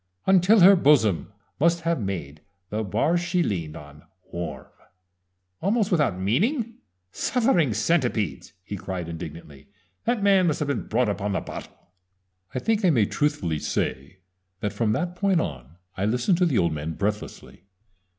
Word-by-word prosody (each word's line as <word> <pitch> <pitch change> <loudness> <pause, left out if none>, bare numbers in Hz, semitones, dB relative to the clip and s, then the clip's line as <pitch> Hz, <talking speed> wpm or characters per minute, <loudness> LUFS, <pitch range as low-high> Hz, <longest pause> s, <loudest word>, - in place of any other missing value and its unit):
"Until 190 +3 +5
her 195 +3 +9
bosom 110 - +3 0.3
must 170 +3 +3
have 165 -5 0
made 80 -7 -5 0.3
The 105 +1 -1
bar 120 - +1
she 180 0 0
leaned 85 - -3
on 75 -1 -13 0.3
warm 80 -6 -5 1.0
almost 205 +2 +1
without 150 - +1
meaning! 220 - 0 0.3
Suffering 225 - +1
Centipedes!" 110 - 0
he 100 - -6
cried 90 -3 -5
indignantly. 80 -4 -9 0.4
"That 235 -3 0
man 195 -3 +4
must 155 - +1
have 150 -2 -2
been 140 - -2
brought 120 +2 +1
up 100 0 -3
on 105 0 -1
the - - 0
bottle!" - - -10 0.6
I - - 0
think 220 - 0
I 185 - +5
may 120 -10 +3
truthfully 105 - -1
say 70 +6 -3 0.4
that 105 - -3
from 110 -2 0
that 175 +7 -2
point 195 -2 +2
on 70 - -5 0.2
I 95 - -1
listened 125 - +1
to 180 - +4
the 135 -8 +1
old 85 -3 +2
man 75 +2 -4
breathlessly. 100 -1 -5
115 Hz, 160 wpm, -25 LUFS, -, 1.0 s, her